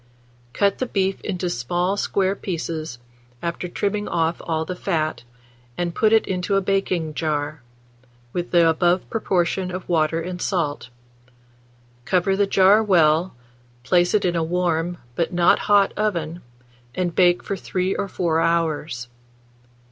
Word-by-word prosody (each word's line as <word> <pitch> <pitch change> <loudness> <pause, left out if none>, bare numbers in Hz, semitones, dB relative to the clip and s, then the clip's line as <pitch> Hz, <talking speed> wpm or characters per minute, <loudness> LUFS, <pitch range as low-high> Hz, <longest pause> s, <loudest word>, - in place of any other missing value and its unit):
Cut 200 -1 +1
the 255 - -1
beef 195 -3 -1
into 180 -3 -3
small 175 +7 -1
square 195 -1 0
pieces, 160 -8 -4 0.5
after 170 +1 -3
trimming 205 +3 -2
off 165 0 0
all 160 -1 -1
the 180 - -5
fat, 160 -4 -2 0.6
and 175 -1 -2
put 215 +4 +2
it 225 0 +4
into 185 +1 -1
a 195 - +3
baking 185 -5 -1
jar, 150 -1 -2 0.7
with 175 0 -3
the 170 -2 +4
above 175 +2 +2
proportion 185 -3 0
of 185 0 -6
water 165 -1 +1
and 180 +1 -5
salt; 150 - -2 1.1
cover 185 +5 +1
the 200 0 +2
jar 195 +2 +5
well, 170 -5 +3 0.5
place 175 +8 +3
it 205 - +2
in 175 -1 +1
a 165 - +1
warm, 175 0 -1 0.2
but 165 +6 -1
not 175 0 +4
hot 205 -1 +5
oven, 175 -6 -2 0.5
and 180 -2 -1
bake 175 0 +3
for 200 - -3
3 185 0 -2
or 200 - -2
4 170 -4 0
hours. 155 -7 -1
175 Hz, 145 wpm, -22 LUFS, 165-190 Hz, 1.1 s, jar